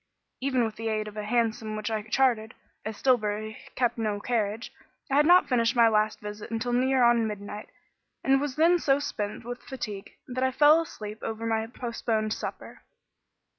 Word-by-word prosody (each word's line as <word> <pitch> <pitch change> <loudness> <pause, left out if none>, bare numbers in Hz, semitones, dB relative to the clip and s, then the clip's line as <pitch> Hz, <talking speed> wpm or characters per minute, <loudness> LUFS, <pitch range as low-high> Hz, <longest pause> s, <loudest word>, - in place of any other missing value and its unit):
Even 260 -2 +1
with 220 -1 -5
the 225 - -4
aid 215 -1 -1
of 210 - -9
a 210 - -4
hansom 220 -1 0
which 215 +1 -3
I 215 -1 -1
chartered, 220 0 +1 0.3
as 215 -1 -5
Stillbury 215 -4 0 0.2
kept 240 -2 0
no 210 -2 -1
carriage, 220 0 -2 0.4
I - - +2
had 295 +1 +5
not 360 +1 +6
finished 235 -1 +2
my 235 -1 +6
last 215 -1 +1
visit 210 +1 -7
until 230 +2 -2
near 260 +1 +3
on 235 -1 +4
midnight, 210 0 -7 0.5
and 270 0 +3
was 285 -3 -3
then 340 +3 +4
so 275 -3 +3
spent 215 -6 -4
with 245 +1 -6
fatigue 215 -7 -7
that 255 +1 -2
I 260 - +3
fell 300 +4 +5
asleep 215 -9 -8
over 225 0 -4
my 225 -1 0
postponed 225 -2 -2
supper. - - -7
230 Hz, 180 wpm, -27 LUFS, 215-255 Hz, 0.5 s, not